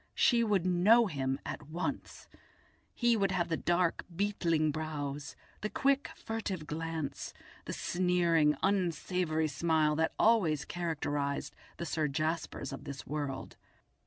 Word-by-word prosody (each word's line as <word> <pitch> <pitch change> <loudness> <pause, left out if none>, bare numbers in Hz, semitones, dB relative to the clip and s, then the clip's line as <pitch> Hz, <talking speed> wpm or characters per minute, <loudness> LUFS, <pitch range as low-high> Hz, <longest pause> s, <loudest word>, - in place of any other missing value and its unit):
She 235 -2 +4
would 200 -5 +2
know 195 +7 +5
him 135 -7 -1
at 145 - -6
once; 170 +3 -4 0.7
he 240 -1 +3
would 200 -3 +2
have 175 -2 0
the 165 - +1
dark 175 +1 +1
beetling 165 -5 +1
brows, 145 -2 -4 0.3
the 210 - -2
quick, 275 +3 +1
furtive 205 -7 -4
glance, 155 -3 -4 0.3
the - - -4
sneering, 170 -4 +2
unsavoury 180 -4 +1
smile 155 0 +2
that 160 0 +1
always 195 -10 +3
characterised 145 -4 -2 0.2
the 170 - -4
Sir 155 -2 0
Jaspers 155 -2 -2
of 135 - -7
this 140 -1 -7
world. 145 -3 -4
165 Hz, 130 wpm, -32 LUFS, 150-185 Hz, 0.7 s, know